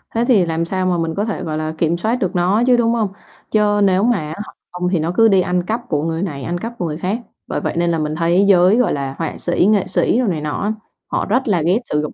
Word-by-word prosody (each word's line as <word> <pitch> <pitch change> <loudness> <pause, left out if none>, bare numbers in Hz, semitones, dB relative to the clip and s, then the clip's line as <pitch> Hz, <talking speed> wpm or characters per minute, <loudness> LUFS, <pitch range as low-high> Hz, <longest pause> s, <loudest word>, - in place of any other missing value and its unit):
thế 230 +1 +2
thì 210 -8 +4
làm 165 0 -1
sao 185 +2 -2
mà 180 -1 +1
mình 165 -1 -2
có 205 - -1
thể, 220 - -4
gọi 155 -1 -3
là, 155 0 -3
kiểm 165 +1 +1
soát 220 +7 0
được 190 -8 -2
nó 185 +6 +2
chứ, 250 -1 +5
đúng 230 -1 +2
hông? 220 -4 0 0.4
Chớ 210 -1 +2
nếu 190 0 +3
mà 240 -1 +3
á 155 - -5
hả, 210 - -8 0.2
hông 180 0 -2
thì 180 -2 +1
nó 160 +2 -1
cứ 225 - +6
đi 195 -3 +4
ăn 180 0 0
cắp 225 +6 -2
của 150 -2 0
người 165 0 -2
này, 145 -8 -4
ăn 175 +6 -2
cắp 230 +5 -5
của 200 - -2
người 155 -2 -3
khác, 195 +8 -2 0.3
bởi - - -3
vậy - - -2
nên 170 0 +1
là 165 - 0
mình 155 0 -2
thấy 170 +4 +2
giới, 185 +2 +5
gọi 250 - +2
là, 135 -1 -3
họa 165 -2 -4
sĩ, 175 0 +1
nghệ 205 -3 +2
sĩ 190 +5 +1
đồ 250 - +1
này 165 -6 -1
nọ 150 -1 -3
á, 210 +2 0 0.3
họ - - -1
rất 250 +5 0
là 185 -6 +2
ghét 185 +6 +3
sử 150 -7 -1
dụng, 150 - -5
180 Hz, 295 wpm, -18 LUFS, 165-210 Hz, 0.4 s, cứ